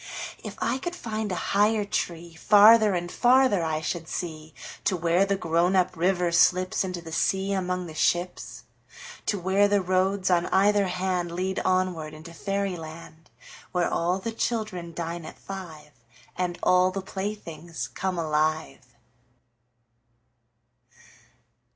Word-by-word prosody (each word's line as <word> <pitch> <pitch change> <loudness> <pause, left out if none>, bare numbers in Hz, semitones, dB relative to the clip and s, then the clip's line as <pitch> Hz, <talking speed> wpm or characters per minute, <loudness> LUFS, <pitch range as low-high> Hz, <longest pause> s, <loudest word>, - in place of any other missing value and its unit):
If - - -7
I 260 - -1
could 350 +5 -4
find 220 - -4
a - - -1 0.2
higher 210 +1 +3
treeFarther 200 +4 +4
and 175 0 -5
farther 250 -6 +4
I 155 -1 -1
should 165 0 -4
see, 155 -3 -6 0.3
To 185 - +1
where 170 +3 +2
the 200 - +1
grown 175 +1 +1
up 185 -1 +2
river 180 0 +1
slipsInto 185 +1 +2
the 165 - -9
sea 190 +4 0
among 180 -1 -2
the 160 - -9
ships. 175 +3 -1 0.6
To 205 - +1
where 190 +3 +3
the 205 0 +2
roads 185 +1 +1
on 175 -1 +2
either 200 +1 +3
handLead 180 0 -2
onward 180 -4 0
into 160 +2 -11
fairy 195 +1 -2
land, 160 0 -11 0.4
Where 180 -1 0
all 175 +2 +1
the 210 +4 -4
children 215 -7 -3
dine 170 0 -5
at - - -10
five, 175 -6 -9 0.4
And 180 -1 -2
all 185 0 +4
the 190 +1 -5
playthings 180 -5 -5
come 190 -1 -3
alive. 155 -2 -1
180 Hz, 130 wpm, -26 LUFS, 170-195 Hz, 0.6 s, treeFarther